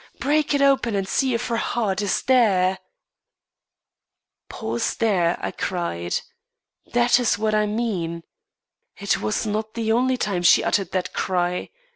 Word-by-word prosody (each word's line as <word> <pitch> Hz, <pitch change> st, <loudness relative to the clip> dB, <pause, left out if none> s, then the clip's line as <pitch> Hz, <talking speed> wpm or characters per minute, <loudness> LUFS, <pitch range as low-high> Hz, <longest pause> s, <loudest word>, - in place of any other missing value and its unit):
Break 295 Hz, +1 st, +1 dB
it 280 Hz, -, +2 dB
open! 270 Hz, -5 st, +2 dB
and 195 Hz, -1 st, -1 dB
see 260 Hz, +4 st, +1 dB
if 240 Hz, +2 st, -2 dB
her 230 Hz, -, 0 dB
heart 215 Hz, -4 st, -1 dB
is 200 Hz, -3 st, -1 dB
there!'" 190 Hz, -8 st, +3 dB, 1.7 s
"Pause 115 Hz, +1 st, -3 dB
there," 180 Hz, -7 st, +1 dB
I -, -, -4 dB
said; 90 Hz, -, -2 dB, 0.7 s
"that 240 Hz, +1 st, +4 dB
is 240 Hz, -4 st, +1 dB
what 215 Hz, 0 st, 0 dB
I 210 Hz, 0 st, +2 dB
mean. 190 Hz, -7 st, -2 dB, 0.7 s
It -, -, -1 dB
was 110 Hz, -, -1 dB
not 215 Hz, +1 st, -3 dB
the 225 Hz, -1 st, -1 dB
only 255 Hz, +3 st, +2 dB
time 200 Hz, -6 st, -1 dB
she 175 Hz, -, +5 dB
uttered 195 Hz, -4 st, 0 dB
that 185 Hz, -1 st, -2 dB
cry. 180 Hz, -1 st, -1 dB
210 Hz, 145 wpm, -23 LUFS, 180-240 Hz, 1.7 s, she